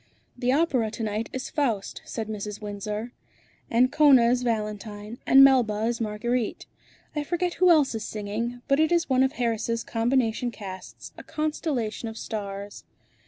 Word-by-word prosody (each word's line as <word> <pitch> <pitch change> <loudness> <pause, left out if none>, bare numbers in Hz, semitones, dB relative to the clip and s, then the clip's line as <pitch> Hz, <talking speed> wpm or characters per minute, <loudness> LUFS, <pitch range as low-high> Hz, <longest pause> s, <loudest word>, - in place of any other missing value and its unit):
"The 250 0 0
opera 265 -6 +2
to 225 - -6
night 215 +1 -2
is 260 - -5
'Faust,'" 235 -10 -1
said 220 -2 -4
Mrs. 210 -1 -5
Windsor. 210 +2 -5 0.6
"Ancona 255 0 +5
is 250 0 +1
Valentine, 215 -1 -3
and 270 +1 +8
Melba 240 -6 +4
is 235 0 -1
Marguerite. 225 +2 -2 0.5
I 300 - 0
forget 350 +3 -1
who 365 - +7
else 300 -6 +5
is 220 -1 -4
singing, 220 +4 -4
but 275 0 +3
it 315 +1 +3
is 340 -4 +1
one 260 0 +4
of 265 +1 +2
Harris' 230 -3 -1
combination 235 0 0
casts, 195 -5 -9
a - - -9
constellation 295 -8 -2
of 220 - -9
stars." 200 -2 -6
235 Hz, 155 wpm, -26 LUFS, 215-265 Hz, 0.6 s, and